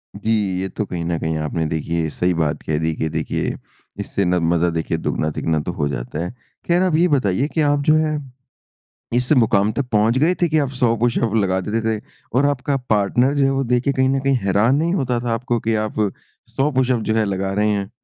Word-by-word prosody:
जी। 110 - -2 0.3
ये 95 - -2
तो 105 - -3
कहीं 90 -3 -4
न 85 0 -1
कहीं 80 0 -2
आपने 75 +1 -2
देखिए 80 +1 -1
सही 90 +4 0
बात 80 -3 -1
कह 75 - -1
दी। 80 - -1
देखिए 80 0 -1
देखिए - - -2 0.4
इससे 100 - -1
न 90 +1 +2
मज़ा 85 0 +2
देखिए 80 0 -2
दुगना-तिगुना 80 0 -1
तक 75 - -5
हो 75 -3 0
जाता 70 +4 -4
है। 90 - -4 0.4
ख़ैर 175 +1 +3
आप 180 -4 +2
ये 170 +3 +4
बताइए 130 - +1
कि 160 - -1
आप 145 -1 +2
जो 155 - +6
है, 155 -1 +1 1.0
इस 125 +3 +1
मुकाम 110 -5 +3
तक 140 +4 -2
पहुँच 110 +3 +3
गए 160 +7 +3
थे 175 - +4
कि 155 - +2
आप 140 -3 0
100 115 -2 +3
पुश-अप 115 -1 +1
लगा 95 -3 +1
देते 110 +4 -2 0.2
थे? - - -18 0.3
और 130 +3 +3
आपका 140 0 0
पार्टनर 110 +6 +2
जो 145 -1 +2
है 135 - +2
वो 135 0 0
देख 125 0 +1
के 140 - +2
कहीं 130 0 +2
न 135 0 +1
कहीं 135 0 +1
हैरान 105 +7 +3
नहीं 165 +4 +1
होता 125 -8 0
था, 120 0 -3
आपको 120 +1 -1
कि 115 0 0
आप 110 - -6 0.6
100 140 +3 +1
पुश-अप 130 -3 +1
जो 110 - +2
है 110 -1 +2
लगा 95 -1 -2
रहे 105 +2 +1
हैं? 100 -2 -1
110 Hz, 230 wpm, -20 LUFS, 90-135 Hz, 1.0 s, जो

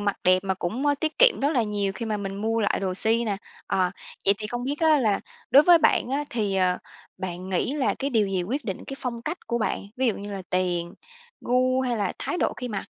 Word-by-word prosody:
mặc 205 -1 0
đẹp 185 0 +5
mà 190 -1 0
cũng, 215 +10 -3
ơ, 290 - +4
tiết 315 -1 -2
kiệm - - +6
rất 280 - +2
là 260 -7 +2
nhiều 205 -2 -1
khi 230 +4 -5
mà 215 -1 -1
mình 195 -1 -5
mua 225 +1 0
lại 205 - +1
đồ 190 -2 -1
si 225 +4 +4
nà. 205 -3 -1 0.3
Ờ, 185 -1 +1 0.3
vậy 200 - +5
thì 215 - -4
không 240 +3 -4
biết 285 +4 -3
á 315 -2 +5
là 215 -6 +1 0.3
đối 280 +3 +8
với 345 +1 +7
bạn 300 - +3
á 285 +2 0
thì, 210 -4 -1
ờ, 185 -1 +2 0.4
bạn 185 0 -5
nghĩ 190 +8 0
là 255 -9 +1
cái 275 +1 -2
điều 220 -5 +2
gì 190 -2 -1
quyết 255 +10 -3
định 195 -4 -5
cái 270 - -7
phong 235 -2 -4
cách 315 +8 -5
của 235 - -1
bạn, 220 - -1 0.2
ví 260 +1 +1
dụ 225 - +2
như 205 0 -7
là 195 -1 -5
tiền, 175 -2 -1 0.5
gu, 255 +1 +2
hay 250 -2 0
là 205 - -1
thái - - -3
độ - - +1
khi 250 - -5
mặc? 205 -4 -4
220 Hz, 260 wpm, -25 LUFS, 195-260 Hz, 0.5 s, đối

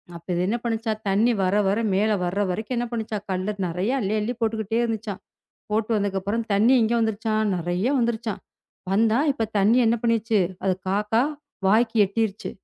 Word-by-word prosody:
அப்போ 170 0 -12
இது 175 - 0
என்ன 230 - 0
பண்ணுச்சாம்? 225 -2 -2
தண்ணி 210 +5 +3
வர, 185 +1 +1
வர 200 +3 +1
மேல 215 +3 +2
வர்ற 180 +3 -2
வரைக்கும் 220 +7 -3
என்ன 240 - 0
பண்ணுச்சாம்? 220 -3 -3
கல்லு 190 +3 -1
நிறைய 180 +8 -1
அள்ளி 210 -2 -1
அள்ளி 225 +4 -2
போட்டுகிட்டே 220 0 0
இருந்துச்சாம். 220 -4 -3 0.5
போட்டு 220 +2 0
வந்தக்கப்புறம் 200 +2 -1
தண்ணி 220 +6 +4
எங்க 225 +1 +2
வந்துருச்சாம்? 220 0 0
நிறைய 175 +3 -2
வந்துருச்சாம். 230 -3 -2 0.5
வந்தா 225 +3 +3
இப்ப 230 -5 -2
தண்ணி 215 +5 +4
என்ன 230 +1 +3
பண்ணிருச்சு? 230 -2 +2 0.2
அதைக் 185 -1 0
காக்கா 210 +3 +1 0.5
வாய்க்கு 225 +2 +3
எட்டிருச்சு. 210 +1 -2
215 Hz, 160 wpm, -24 LUFS, 195-230 Hz, 0.5 s, தண்ணி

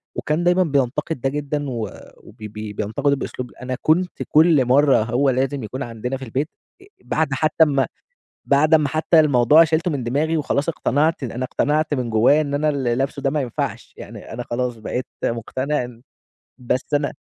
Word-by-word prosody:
وكان 155 +3 -1
دايمًا 180 +1 +4
بينتقد 140 -1 -1
ده 135 - +1
جدًا، 145 +1 -3
وب 115 -3 -8
بينتقده 110 +6 -2
بأسلوب 125 -2 -6
أنا 130 0 -3
كنت 175 +3 +1
كُلّ 155 -3 +4
مَرّة 135 -1 +4
هو 125 +5 +1
لازم 135 +1 -1
يكون 130 +6 -5
عندنا 120 +3 -4
في 135 - -8
البيت، 135 +7 -2 0.3
آآ 385 - -16 0.2
بعد 160 0 0
حتى 155 +4 +3
أما 140 -4 +2 0.6
بعد 150 +3 +3
أما 150 -2 +5
حتى 155 +2 +3
الموضوع 145 +1 +5
شيلتُه 165 +2 0
من 140 -4 -3
دماغي 150 +7 0
وخلاص 145 +1 0
اقتنعت، 155 -1 0
أنا 125 +1 -4
اقتنعت 150 +3 0
من 125 -4 -2
جوايا 120 +7 +4
إن 140 -2 -4
أنا 150 +2 +1
اللي 130 -5 0
لابسه 135 +2 -2
ده 135 - +1
ما 150 +1 -1
ينفعش، 125 -4 -4
يعني - - -10
أنا 120 - -5
خلاص 120 0 -3
بقيت 125 +3 -4 0.2
مُقتنع 130 +5 -2
إن 120 -1 -10 0.6
بس 125 +1 -2
أنا 145 0 +1
140 Hz, 175 wpm, -21 LUFS, 125-150 Hz, 0.6 s, أما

